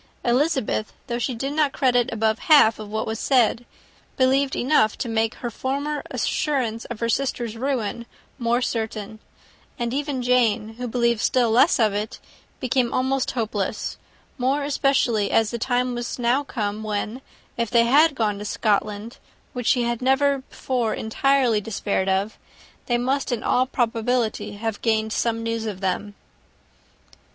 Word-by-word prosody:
Elizabeth, 255 -3 0
though 235 0 -3
she 245 +1 -2
did 275 +5 -3
not 295 -2 +1
credit 245 -2 +2
above 220 -1 0
half 230 -8 +6
of 215 -1 -7
what 220 +1 -2
was 220 0 -4
said, 245 -2 +2 0.5
believed 265 +1 +2
enough 245 -5 +2
to - - -3
make 225 0 0
her 240 - -5
former 280 +5 -2
assurance 245 -7 -1
of 240 -3 -7
her 230 - +1
sister's 240 -2 -1
ruin 235 -2 -2
still - - -30
more 240 +2 +2
certain; 220 -2 -3 0.6
and 240 -1 -2
even 280 -2 -2
Jane, 235 -3 +2
who 250 - -3
believed 235 -1 +1
still 245 -3 +2
less 250 +7 +4
of 215 -3 +3
it, 210 +1 -4 0.4
became 255 -1 +1
almost 260 +1 0
hopeless, 210 -2 -2 0.4
more 270 +3 +1
especially 270 -7 +1
as 220 -1 +2
the 235 - -4
time 250 +1 0
was 240 0 -4
now 245 +3 +1
come, 210 -6 -3
when, 215 +3 -3 0.3
if 235 -2 -1
they 235 -1 +4
had 285 +5 +4
gone 210 -4 0
to - - -5
Scotland, 210 +1 -1 0.4
which 245 -2 -4
she 250 -3 +3
had 235 0 -2
never 275 +2 +3
before 250 -3 -2
entirely 245 -1 +2
despaired 200 -2 -1
of, 195 +3 -1 0.5
they 240 - +2
must 265 +3 -1
in 235 -2 -2
all 255 +1 +2
probability 235 -2 -1
have 215 +1 -4
gained 220 -1 +1
some 230 -1 0
news 230 -1 -2
of 200 -3 -5
them. 200 +2 -2
235 Hz, 160 wpm, -23 LUFS, 220-260 Hz, 0.6 s, half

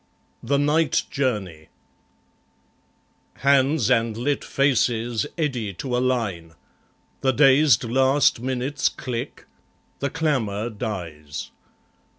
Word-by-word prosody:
The 140 +4 0
Night 150 0 +2
Journey 95 - -2 1.7
Hands 140 -1 +2
and 115 -2 +1
lit 140 +4 -1
faces 120 -3 +1
eddy 125 -10 -2
to 125 +5 -3
a - - +2
line; 105 -11 -2 0.6
The 135 - +2
dazed 135 -1 +5
last 130 +3 +3
minutes 130 +3 -1
click; 120 -3 -6 0.5
the 140 - -1
clamour 120 -9 -1
dies. 85 -10 -6
125 Hz, 95 wpm, -23 LUFS, 110-140 Hz, 1.7 s, dazed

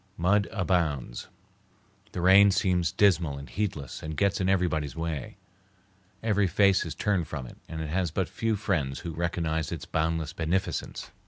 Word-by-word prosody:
Mud 100 +4 +2
abounds. 85 - -1 0.9
The 90 - -3
rain 95 +3 +7
seems 90 -4 +1
dismal 85 -8 +3
and 70 0 -8
heedless 90 -10 -4
and 80 0 -5
gets 100 -1 +1
in 95 - +1
everybody's 80 -7 0
way. 80 -5 -4 0.9
Every 105 -3 +2
face 100 +1 +4
is 80 - -6
turned 100 -6 0
from 70 -5 -5
it, - - -12
and 80 -1 -5
it 80 - -4
has 90 +2 0
but 90 +4 -1
few 115 -1 -1
friends 85 -10 -1
who 85 - -5
recognize 80 -2 -1
its 80 -2 -5
boundless 80 -1 -1
beneficence. 85 +3 -2
85 Hz, 160 wpm, -28 LUFS, 80-95 Hz, 0.9 s, rain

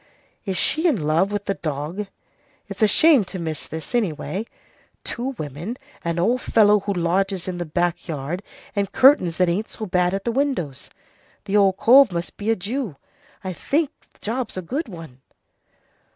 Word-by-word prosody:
Is 190 -3 -2
she 320 - +3
in 280 - +2
love 165 +6 +2
with 205 -1 -3
the 200 - 0
dog? 160 +5 -4 0.6
It's - - -8
a 215 - +6
shame 295 +3 +6
to 190 - -6
miss 160 -3 -4
this, 160 +7 -7
anyway. 205 -1 -1 0.6
Two 255 +3 -4
women, 155 - -5 0.3
an 170 0 -2
old 235 +9 +2
fellow 210 -1 +4
who 200 +1 -2
lodges 185 +2 0
in 180 -1 -4
the 175 - -3
back 175 +3 -1
yard, 155 +3 -4 0.3
and 200 -1 -1
curtains 225 - +5
that 180 - +3
ain't 190 +6 -1
so 220 - -6
bad 180 -1 +1
at 195 - -4
the 235 - +1
windows. 245 - -2 0.6
The 200 - -1
old 195 -2 +4
cove 260 -1 +7
must 170 0 -4
be 210 +2 -4
a 225 - +4
Jew. 220 - -4 0.5
I 185 -1 -3
think 290 - 0 0.2
the - - -28
job's 230 -1 -3
a 185 - -3
good 275 - -3
one." 165 - -11
195 Hz, 180 wpm, -23 LUFS, 170-225 Hz, 0.6 s, cove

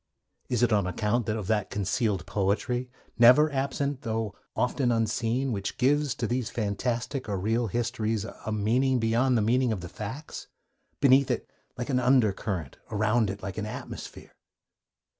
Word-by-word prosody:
Is 125 -1 +1
it 120 -2 +3
on 100 -3 +2
account 105 +4 0
of 110 -2 -2
that 105 -1 0
concealed 100 0 -1
poetry, 110 +6 -1 0.3
never 130 +6 +7
absent 140 0 -1
though 110 -2 -2 0.2
often 125 0 +1
unseen, 115 +3 0
which 100 -3 -3
gives 145 +2 +2
to 120 - -2
these 120 0 -1
fantastic 120 +5 -2
or 100 - -1
real 110 +5 0
histories 115 -1 -1
a 110 - -7
meaning 120 +5 +2
beyond 120 +2 +2
the 110 - +2
meaning 125 +2 +2
of 100 -5 -2
the 90 - -7
facts, 110 - -7 0.5
beneath 135 -1 +5
it - - -1 0.3
like 125 +3 -3
an 125 - +2
under 125 -5 +4
current, 90 -9 -4
around 110 +1 +2
it 95 0 -6
like 100 +2 -4
an 105 - -3
atmosphere? 105 - -8
115 Hz, 160 wpm, -27 LUFS, 105-125 Hz, 0.5 s, never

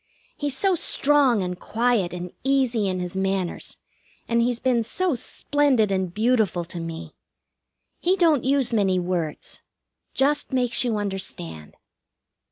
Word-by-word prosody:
He's 290 -2 -2
so 390 +3 +2
strong 280 - +3
and 180 0 -5
quiet 230 -5 0
and 180 0 -6
easy 255 -6 +1
in 185 -1 -2
his 180 0 -5
manners, 190 -2 -2 0.5
and 235 0 +2
he's 240 0 +1
been 250 -2 +1
so 350 +10 -1
splendid 260 -3 0
and 190 -2 -1
beautiful 215 -4 +1
to 175 0 -7
me. 165 -1 -7 0.9
He 365 +2 +2
don't 325 -8 +3
use 270 -2 +2
many 195 -4 +2
words. 175 -4 -3 0.5
Just 290 +2 +1
makes 250 -1 +3
you 235 -3 0
understand. 190 - -5
225 Hz, 135 wpm, -24 LUFS, 185-265 Hz, 0.9 s, strong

